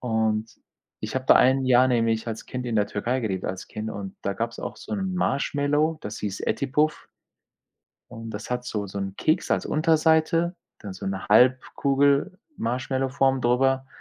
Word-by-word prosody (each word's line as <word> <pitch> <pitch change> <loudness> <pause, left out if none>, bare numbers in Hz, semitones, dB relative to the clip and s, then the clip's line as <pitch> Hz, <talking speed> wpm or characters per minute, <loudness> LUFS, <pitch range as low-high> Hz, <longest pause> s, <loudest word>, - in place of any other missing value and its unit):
und 110 -2 0 0.5
ich 110 - -5
habe 130 0 -2
da - - +7
1 130 +1 +4
Jahr 130 0 +5
nämlich 115 -2 +1
als 115 -1 -5
Kind 125 0 -5
in 115 - -2
der 105 -1 +2
Türkei 125 +5 -2
gelebt 95 -5 -3
als 95 - -5
Kind 110 +1 -5
und 100 -1 -7
da 100 - -1
gab's 115 0 -4
auch - - -6
so - - -9
'n 190 -3 -2
Marshmallow, 145 +1 0
das 105 +2 -6
hieß 105 -2 -4
Eti 140 - 0
Puf 150 +3 0 1.0
und 115 -1 -8
das 105 +3 -7
hat 125 0 -2
so 105 -5 -3
so 100 +1 -6
'n 95 -1 -4
Keks 155 - 0
als - - +1
Unterseite, 160 +2 +2 0.2
dann 100 -2 -8
so 95 - -7
'ne 95 0 -4
Halbkugel-Marshmallow-Form 135 - +1
drüber 130 +2 +2
125 Hz, 170 wpm, -25 LUFS, 110-140 Hz, 1.0 s, da